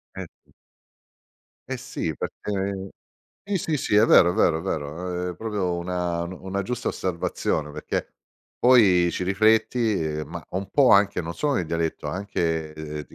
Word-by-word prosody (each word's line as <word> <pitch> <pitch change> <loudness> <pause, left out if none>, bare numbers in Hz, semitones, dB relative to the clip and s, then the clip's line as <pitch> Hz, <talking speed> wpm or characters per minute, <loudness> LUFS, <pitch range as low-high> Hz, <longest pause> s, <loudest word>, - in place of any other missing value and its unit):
Eh, 95 -1 -5 0.2
sì. - - -29 1.2
Eh, - - -1
sì, - - -4
perchè 100 -1 -4 0.6
sì, 200 -1 -2
sì, 160 -4 -1
sì, 105 - -1
è 105 - +7
vero, 90 -6 +6
è - - -7
vero, 85 -6 +3
è - - -5
vero, 90 +2 -3
è - - -7
proprio 100 -3 -2
una 85 -1 -2
nu 90 +1 -8
una 95 +1 -2
giusta 120 +5 -3
osservazione, 85 -4 -2
perché 75 - -3 0.5
poi 100 -9 +5
ci 90 - -3
rifletti 110 +3 +2 0.2
e - - -4
ma - - -8
un 95 +1 -4
po' 140 -3 +4
anche, 100 -2 +4
non 85 +1 -5
sono 145 - -1
nel 90 - 0
dialetto, 80 -1 -2
anche, 80 -2 -2
ehm, 75 -1 -6
ti - - -18
90 Hz, 170 wpm, -24 LUFS, 85-105 Hz, 1.2 s, è